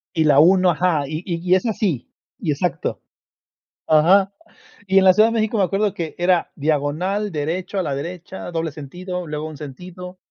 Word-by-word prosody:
Y 160 Hz, -1 st, +2 dB
la 145 Hz, -2 st, +5 dB
1, 180 Hz, +3 st, +5 dB
ajá, 170 Hz, -2 st, +1 dB
y 155 Hz, +2 st, -4 dB
y 175 Hz, -3 st, -2 dB
y 180 Hz, +1 st, +3 dB
es 185 Hz, -, 0 dB
así, 195 Hz, -, -1 dB, 0.3 s
y 185 Hz, -, -2 dB
exacto. 165 Hz, +4 st, -2 dB, 0.8 s
Ajá. 190 Hz, +6 st, +4 dB, 0.5 s
Y 190 Hz, 0 st, +4 dB
en 190 Hz, -, +4 dB
la 185 Hz, -, +8 dB
Ciudad 215 Hz, +3 st, +5 dB
de 230 Hz, -, -2 dB
México, 220 Hz, 0 st, 0 dB
me 200 Hz, -, +3 dB
acuerdo 195 Hz, +2 st, 0 dB
que 165 Hz, -3 st, -5 dB
era 175 Hz, 0 st, +1 dB
diagonal 160 Hz, +7 st, -1 dB
derecho, 170 Hz, +6 st, -3 dB
a 190 Hz, -, +1 dB
la 145 Hz, -4 st, -2 dB
derecha, 175 Hz, +5 st, -6 dB
doble 165 Hz, -2 st, -2 dB
sentido, 180 Hz, +5 st, -6 dB
luego 150 Hz, 0 st, -4 dB
un 155 Hz, -, -8 dB
sentido. 180 Hz, +6 st, -9 dB
180 Hz, 185 wpm, -21 LUFS, 155-190 Hz, 0.8 s, la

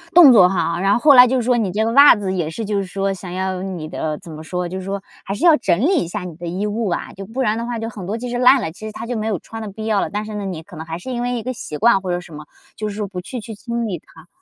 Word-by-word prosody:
动 305 Hz, -8 st, +10 dB
作 180 Hz, -5 st, +7 dB
哈， 170 Hz, -2 st, -1 dB
然 195 Hz, +1 st, +2 dB
后 -, -, +4 dB
后 290 Hz, 0 st, +6 dB
来 250 Hz, -1 st, +9 dB
就 260 Hz, -, 0 dB
是 -, -, -1 dB
说 245 Hz, +1 st, +2 dB
你 210 Hz, -6 st, 0 dB
这 215 Hz, +3 st, 0 dB
个 230 Hz, -, 0 dB
袜 280 Hz, 0 st, +8 dB
子 195 Hz, -2 st, -3 dB
也 170 Hz, -4 st, -1 dB
是 220 Hz, +6 st, -5 dB
就 205 Hz, 0 st, -1 dB
是 195 Hz, -, 0 dB
说 195 Hz, +1 st, -2 dB
想 180 Hz, -1 st, -8 dB
要 185 Hz, 0 st, -2 dB
你 180 Hz, -5 st, -5 dB
的 155 Hz, -2 st, -3 dB
怎 165 Hz, -, -12 dB
么 155 Hz, 0 st, -8 dB
说， 180 Hz, +2 st, -3 dB
就 185 Hz, +2 st, -5 dB
是 185 Hz, -, -8 dB
说 195 Hz, 0 st, -4 dB, 0.2 s
还 195 Hz, -, -4 dB
是 345 Hz, -, -1 dB
要 325 Hz, -3 st, +8 dB
整 175 Hz, -1 st, +1 dB
理 340 Hz, -, +3 dB
一 -, -, -6 dB
下 190 Hz, +1 st, -5 dB
你 175 Hz, -3 st, -7 dB
的 175 Hz, 0 st, -7 dB
衣 185 Hz, +5 st, -2 dB
物 210 Hz, -1 st, -1 dB
吧， 175 Hz, -, -3 dB
就 195 Hz, 0 st, -8 dB
不 255 Hz, +4 st, -4 dB
然 220 Hz, -1 st, +1 dB
的 235 Hz, -, -3 dB
话 240 Hz, -1 st, -3 dB
就 225 Hz, 0 st, -4 dB
很 195 Hz, -5 st, -8 dB
多 220 Hz, +3 st, -2 dB
其 245 Hz, +1 st, -5 dB
实 245 Hz, 0 st, -3 dB
烂 255 Hz, +2 st, +6 dB
了， 160 Hz, -, -3 dB
其 215 Hz, +5 st, -9 dB
实 -, -, -6 dB
它 225 Hz, +2 st, -7 dB
就 245 Hz, 0 st, -3 dB
没 215 Hz, 0 st, -2 dB
有 205 Hz, -5 st, 0 dB
穿 225 Hz, +5 st, -9 dB
的 215 Hz, -, -5 dB
必 220 Hz, +2 st, -7 dB
要 215 Hz, -3 st, +1 dB
了。 -, -, -2 dB
但 210 Hz, +1 st, -3 dB
是 215 Hz, -, -7 dB
呢 205 Hz, -1 st, -4 dB
你 170 Hz, -4 st, -5 dB
可 180 Hz, +1 st, -14 dB
能 160 Hz, -, -6 dB
还 165 Hz, +1 st, -5 dB
是 255 Hz, +9 st, -7 dB
因 240 Hz, -1 st, -2 dB
为 245 Hz, 0 st, -1 dB
一 225 Hz, -, -5 dB
个 255 Hz, +1 st, -3 dB
习 150 Hz, -9 st, -6 dB
惯 220 Hz, -3 st, +4 dB
或 185 Hz, -, -5 dB
者 175 Hz, -, 0 dB
什 175 Hz, -3 st, -13 dB
么， 150 Hz, 0 st, -9 dB, 0.3 s
就 215 Hz, 0 st, -3 dB
是 200 Hz, -, -7 dB
说 210 Hz, -1 st, -2 dB
不 180 Hz, -2 st, -6 dB
去 250 Hz, +6 st, -6 dB
去 225 Hz, +1 st, -8 dB
清 235 Hz, +2 st, -4 dB
理 180 Hz, -7 st, -3 dB
它， 160 Hz, +1 st, -18 dB
205 Hz, 385 characters per minute, -20 LUFS, 180-230 Hz, 0.3 s, 动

